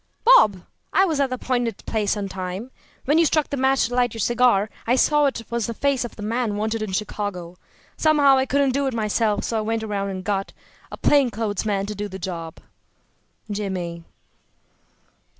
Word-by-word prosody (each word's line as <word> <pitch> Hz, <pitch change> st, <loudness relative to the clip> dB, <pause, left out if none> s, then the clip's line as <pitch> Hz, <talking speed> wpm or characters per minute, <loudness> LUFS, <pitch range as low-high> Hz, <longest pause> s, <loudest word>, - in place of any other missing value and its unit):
~"Bob: 215 Hz, -, +6 dB, 0.3 s
I 385 Hz, -, +4 dB
was 315 Hz, -6 st, -1 dB
at 275 Hz, -1 st, +2 dB
the 255 Hz, -, -2 dB
appointed 245 Hz, -2 st, -2 dB
place 215 Hz, -2 st, 0 dB
on 200 Hz, -1 st, -3 dB
time. 190 Hz, +5 st, -6 dB, 0.3 s
When 295 Hz, +4 st, +3 dB
you 335 Hz, -, +5 dB
struck 310 Hz, 0 st, 0 dB
the -, -, 0 dB
match 265 Hz, 0 st, +2 dB
to 245 Hz, -, -8 dB
light 245 Hz, -2 st, +1 dB
your -, -, -6 dB
cigar 240 Hz, -2 st, +3 dB, 0.2 s
I 245 Hz, -, +4 dB
saw 295 Hz, +2 st, +3 dB
it 250 Hz, -4 st, -3 dB
was 235 Hz, -2 st, -1 dB
the 230 Hz, -, -4 dB
face 280 Hz, -1 st, +1 dB
of 240 Hz, -, -7 dB
the 210 Hz, -, -8 dB
man 225 Hz, 0 st, -1 dB
wanted 220 Hz, +1 st, -2 dB
in 215 Hz, -3 st, -3 dB
Chicago. 185 Hz, -3 st, -4 dB, 0.4 s
Somehow 295 Hz, -3 st, +5 dB
I 265 Hz, -, 0 dB
couldn't 280 Hz, 0 st, +2 dB
do 280 Hz, +1 st, 0 dB
it 260 Hz, -, -2 dB
myself, 215 Hz, -1 st, 0 dB
so 225 Hz, -, -1 dB
I -, -, -1 dB
went 225 Hz, +1 st, -2 dB
around 200 Hz, -2 st, -2 dB
and 185 Hz, -1 st, -5 dB
got 195 Hz, -1 st, -2 dB, 0.4 s
a -, -, -7 dB
plain 280 Hz, -3 st, +3 dB
clothes 215 Hz, -2 st, -3 dB
man 200 Hz, -2 st, 0 dB
to 210 Hz, -, -5 dB
do 205 Hz, 0 st, -4 dB
the 190 Hz, -1 st, -8 dB
job. 170 Hz, -4 st, -6 dB, 0.9 s
JIMMY." 185 Hz, -5 st, -4 dB
225 Hz, 200 wpm, -23 LUFS, 200-260 Hz, 0.9 s, ~"Bob